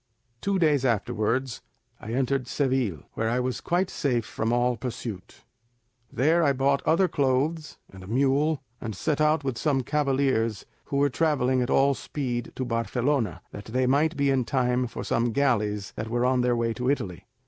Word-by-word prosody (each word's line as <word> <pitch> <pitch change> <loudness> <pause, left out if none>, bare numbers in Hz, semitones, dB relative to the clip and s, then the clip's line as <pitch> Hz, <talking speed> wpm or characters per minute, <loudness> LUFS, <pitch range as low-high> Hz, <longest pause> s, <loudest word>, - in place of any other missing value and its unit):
Two 200 -1 0
days 150 -6 +3
afterwards 115 +2 0 0.4
I 110 - -7
entered 135 0 0
Seville, 130 - 0
where 115 - -1
I 120 +2 +1
was 125 -1 -2
quite 180 +2 0
safe 125 -6 0
from 110 +1 -2
all 120 +1 +2
pursuit. 115 -6 -7 0.7
"There 160 +7 +3
I 140 -3 +3
bought 135 +1 +1
other 185 +4 +4
clothes, 145 +1 0 0.2
and 95 -1 -11
a - - -11
mule, 140 +5 +1 0.2
and 110 -3 -5
set 150 - -1
out 155 -1 +3
with 130 -4 -3
some 140 -4 +1
cavaliers 135 -6 0 0.2
who 140 - -2
were 140 0 +3
travelling 130 -4 +1
with 125 0 -1
all 140 +1 +4
speed 125 -4 -4
to 130 - -3
Barcelona, 120 +2 -1
that 100 - -9
they 130 +3 0
might 145 +5 +2
be 140 -1 +2
in 130 -2 +2
time 125 -1 0
for - - -6
some 115 0 0
galleys 105 -7 0
that 110 - -5
were 120 +1 0
on 130 0 +2
their 125 0 +2
way 115 -1 0
to 125 +2 -2
Italy. 95 - -2
130 Hz, 180 wpm, -26 LUFS, 120-140 Hz, 0.7 s, other